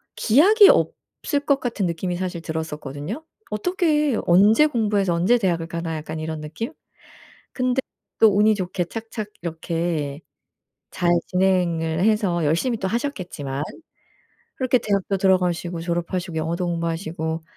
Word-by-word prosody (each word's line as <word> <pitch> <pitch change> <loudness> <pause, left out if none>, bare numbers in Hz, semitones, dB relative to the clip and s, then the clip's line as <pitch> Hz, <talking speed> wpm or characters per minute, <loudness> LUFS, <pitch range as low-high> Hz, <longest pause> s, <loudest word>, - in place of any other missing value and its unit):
기약이 390 - +6
없을 285 -2 0
것 280 -1 +3
같은 235 -6 -2
느낌이 175 +1 -2
사실 180 -2 -4
들었었거든요. 160 - -5 0.3
'어떻게, 300 - +1
언제 205 +10 +6
공부해서 210 - +1
언제 180 +9 +3
대학을 170 -6 0
가나.' 165 -1 -4
약간 155 +1 -6
이런 160 0 -4
느낌? 160 +10 -5 0.8
근데 255 0 0 0.4
또 225 - +7
운이 215 +1 +5
좋게 180 -2 -2
착착 220 +1 -6
이렇게 165 -3 -3 0.7
잘 175 -2 0 0.2
진행을 175 -3 +1
해서 205 -6 +2
열심히 170 - +1
또 190 - -2
하셨겠지만, 180 - -3 0.9
그렇게 255 -1 +2
대학도 200 -2 0
들어가시고 180 -3 +1
졸업하시고 175 +1 -3
영어도 165 +3 -1
공부하시고 165 -1 -3
180 Hz, 315 characters per minute, -23 LUFS, 165-220 Hz, 0.9 s, 또